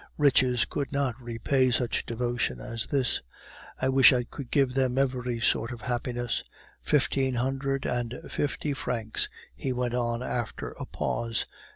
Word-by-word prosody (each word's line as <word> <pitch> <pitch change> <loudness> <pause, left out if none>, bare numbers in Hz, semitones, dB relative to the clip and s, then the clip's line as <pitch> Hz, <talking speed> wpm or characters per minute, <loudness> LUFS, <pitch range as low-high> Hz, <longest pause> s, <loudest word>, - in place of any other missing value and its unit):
Riches 130 -4 +4
could 140 -2 -3
not 140 -3 +1
repay 125 +3 +1
such 120 0 0
devotion 120 - -1
as 115 - -4
this. 135 -3 +1 0.6
I 130 - +1
wish 135 0 +8
I 125 -2 +2
could 125 +1 -8
give 135 -3 +3
them 130 -1 +1
every 125 -3 0
sort 115 +1 +2
of 120 -2 -7
happiness! 120 -1 -2 0.4
Fifteen 135 -3 +2
hundred 135 +2 -1
and 120 -1 -1
fifty 145 0 -1
francs," 115 -4 -2 0.3
he 130 - -2
went 125 -1 -1
on 120 0 0
after 120 -2 -3
a - - -5
pause. 115 -1 -1
125 Hz, 150 wpm, -28 LUFS, 120-135 Hz, 0.6 s, wish